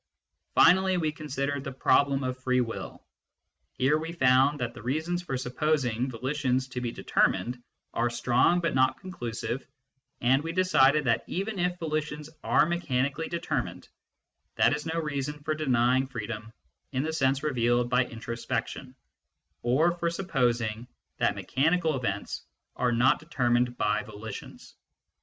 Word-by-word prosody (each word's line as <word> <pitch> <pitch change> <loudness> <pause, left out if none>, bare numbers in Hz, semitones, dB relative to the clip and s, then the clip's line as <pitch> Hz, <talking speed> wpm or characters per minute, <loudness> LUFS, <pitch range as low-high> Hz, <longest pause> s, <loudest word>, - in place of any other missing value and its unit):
Finally 185 +2 +5
we 160 -3 0
considered 140 -2 -3
the 140 - -5
problem 140 +1 +2
of 130 0 -3
free 130 0 +2
will: 115 -6 -4 0.7
here 145 +4 +2
we 160 +1 -5
found 135 -1 +3
that 120 -1 -2
the - - -10
reasons 160 +9 -1
for 135 -7 -3
supposing 125 -2 0
volitions 130 +1 -1
to 125 -1 -5
be 120 -1 -2
determined 120 +5 0 0.3
are 120 +1 +1
strong 120 +8 +3
but 165 -2 0
not 130 0 +2
conclusive, 120 - -4 0.6
and 130 +3 +3
we 165 +1 -4
decided 150 -5 +4
that 115 -3 +1
even 200 +2 -3
if 180 0 0
volitions 150 -2 -3
are - - +4
mechanically 155 -3 -1
determined, 170 -1 -3 0.7
that - - +4
is 150 +2 -6
no 165 +1 -1
reason 150 -2 -3
for 155 0 0
denying 130 -3 +2
freedom 115 -2 -6 0.4
in 130 0 -1
the 160 +1 -2
sense 135 -2 +1
revealed 120 -4 +2
by 125 +1 +3
intro 115 -1 -6
spection, 115 - -4 0.7
or 140 +8 +3
for 170 0 -1
supposing 120 - -1 0.3
that - - +1
mechanical 160 +3 +1
events 120 -6 -3 0.3
are 125 -1 +1
not 120 +3 +3
determined 125 -5 0
by 105 0 +1
volitions. 110 0 -9
130 Hz, 145 wpm, -28 LUFS, 120-155 Hz, 0.7 s, Finally